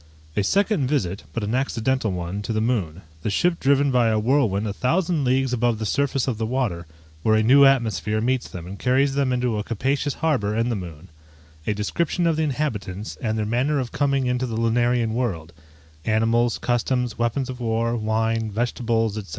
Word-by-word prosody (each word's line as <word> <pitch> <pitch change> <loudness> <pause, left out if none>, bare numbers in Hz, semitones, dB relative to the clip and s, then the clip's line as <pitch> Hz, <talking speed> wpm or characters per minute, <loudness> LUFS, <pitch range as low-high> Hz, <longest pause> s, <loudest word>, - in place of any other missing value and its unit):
_A 105 - +1
second 195 - +2
visit 100 -10 -1
(but 115 - -3
an 105 +2 -2
accidental 130 -3 0
one) 90 +2 -4
to 110 - -3
the 110 - 0
moon 100 -7 -1 0.2
The 105 - -2
ship 170 - +1
driven 140 0 +3
by 125 -2 +3
a 110 -1 +2
whirlwind 110 -3 +1
a 105 - -2
thousand 165 - 0
leagues 130 0 +1
above 120 -1 +1
the 110 - -4
surface 135 +3 0
of 115 -4 -2
the 110 - 0
water, 110 -10 -2 0.3
where 110 +6 +3
a 110 - +3
new 140 +5 +7
atmosphere 115 -5 +2
meets 125 +2 0
them 85 -2 -8
and 95 +2 -8
carries 135 +2 +2
them 140 -2 +1
into 125 -3 0
a - - -2
capacious 135 +6 -1
harbour 125 -11 0
in 115 +2 +1
the 120 - 0
moon 90 -3 -8 0.6
A 105 - +1
description 170 - -1
of 165 -1 +2
the 160 - -1
inhabitants, 115 -9 -3
and 110 -3 -1
their 110 - -1
manner 130 +7 +1
of 125 -3 -3
coming 140 -2 +1
into 125 +1 0
the 115 -2 -4
lunarian 120 0 +1
world 90 -10 -2 0.5
Animals, 115 +2 +2
customs, 125 -1 -1
weapons 120 +3 0
of 130 -1 -7
war, 115 0 0
wine, 110 0 0
vegetables, 115 -1 -1
&c. - - -16
120 Hz, 195 wpm, -23 LUFS, 110-130 Hz, 0.6 s, new